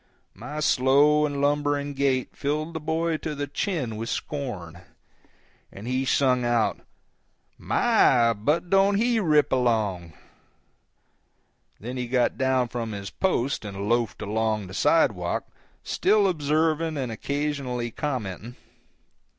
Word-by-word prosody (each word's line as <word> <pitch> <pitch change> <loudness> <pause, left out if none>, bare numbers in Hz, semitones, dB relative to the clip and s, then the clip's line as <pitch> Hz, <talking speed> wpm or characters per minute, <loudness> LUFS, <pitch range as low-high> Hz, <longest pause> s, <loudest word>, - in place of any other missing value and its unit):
My 145 +9 -6
slow 145 +3 +4
and 140 -1 -4
lumbering 145 0 0
gait 135 -2 0
filled 155 +3 -2
the 160 - -3
boy 160 +1 -1
to 155 -1 -5
the 145 0 -3
chin 145 - -3
with 115 +1 -4
scorn, 95 - -5 0.9
and 100 +4 -9
he 130 +1 0
sung 130 -2 +2
out, 120 -2 +1 0.8
"My, 115 -2 +3
but 150 - -1
don't 195 +1 +4
he 230 +2 +2
rip 155 -7 +3
along!" 110 -10 0 1.7
Then 125 +4 -6
he 125 -1 -3
got 125 0 +1
down 130 -1 +1
from 115 -2 -4
his 100 -1 -6
post 140 -11 -1
and 100 -1 -5
loafed 115 -1 0
along 110 0 -1
the 95 - -10
sidewalk, 105 - +1 0.4
still 205 0 +2
observing 160 -1 0
and 130 -4 -3
occasionally 135 -2 -3
commenting. 120 -4 -4
130 Hz, 125 wpm, -25 LUFS, 115-150 Hz, 1.7 s, slow